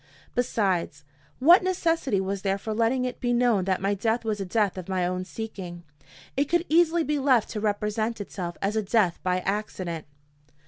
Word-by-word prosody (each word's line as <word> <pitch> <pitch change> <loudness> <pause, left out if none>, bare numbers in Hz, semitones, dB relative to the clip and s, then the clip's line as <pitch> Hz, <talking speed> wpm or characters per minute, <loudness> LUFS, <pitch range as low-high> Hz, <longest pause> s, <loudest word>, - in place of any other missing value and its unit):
Besides, 190 -11 0 0.3
what 340 +8 +7
necessity 330 - +1
was 195 0 -2
there 195 0 0
for 215 +2 -4
letting 230 +3 +1
it 250 - -4
be 245 -1 0
known 235 -6 +3
that 190 -1 +1
my 200 +1 +2
death 225 +3 -1
was 210 -2 -1
a - - -2
death 205 0 +1
of 185 -1 -7
my 185 -2 0
own 185 +1 -2
seeking? 185 -5 -7 0.5
It 280 - +2
could 345 +3 +1
easily 335 +1 +4
be 300 -1 0
left 260 -5 +3
to 215 - -3
represent 210 +2 -1
itself 180 -4 -5
as 200 +2 0
a 220 - +2
death 200 -4 +1
by 185 0 0
accident. 185 -5 -3
210 Hz, 185 wpm, -26 LUFS, 190-245 Hz, 0.5 s, what